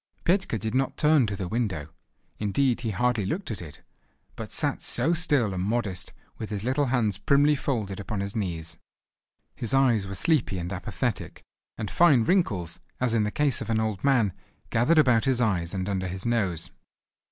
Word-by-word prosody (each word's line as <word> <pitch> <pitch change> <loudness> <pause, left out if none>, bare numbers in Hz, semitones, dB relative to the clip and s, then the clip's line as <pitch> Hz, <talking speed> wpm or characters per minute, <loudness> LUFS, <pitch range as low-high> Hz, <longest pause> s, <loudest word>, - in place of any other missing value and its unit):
Petka 185 - +1
did 110 +1 -4
not 135 +1 0
turn 150 -5 +4
to 100 - -3
the 95 -2 -4
window, 95 -9 -2 0.5
indeed, 120 +4 +1
he 115 - -2
hardly 120 0 +1
looked 165 - -3
at 100 - -5
it, 75 -4 -10 0.5
but - - -7
sat - - -1
so 140 +8 0
still 145 - +1
and 90 - -2
modest, 105 -2 -2 0.3
with 110 - -5
his 105 -2 -4
little 135 +4 +1
hands 110 -6 0
primly 145 +4 +4
folded 110 -9 -2
upon 100 +1 -4
his 100 +1 -3
knees. 85 -6 -4 0.7
His 120 +3 -1
eyes 120 -7 +3
were 100 - -5
sleepy 145 - +2
and 90 +2 -4
apathetic, 90 - -4 0.3
and 105 - -4
fine 150 -9 +5
wrinkles, 105 - 0 0.2
as 125 -2 +1
in 110 -2 +2
the - - 0
case 145 0 +1
of - - -5
an 110 -1 +2
old 110 -3 -2
man, 125 -9 +3 0.4
gathered 135 +9 +3
about 125 -6 +4
his 130 -2 +2
eyes 90 -8 +1
and 95 0 -3
under 95 -2 -1
his 95 +1 -5
nose. 100 -9 0
110 Hz, 185 wpm, -26 LUFS, 95-135 Hz, 0.7 s, fine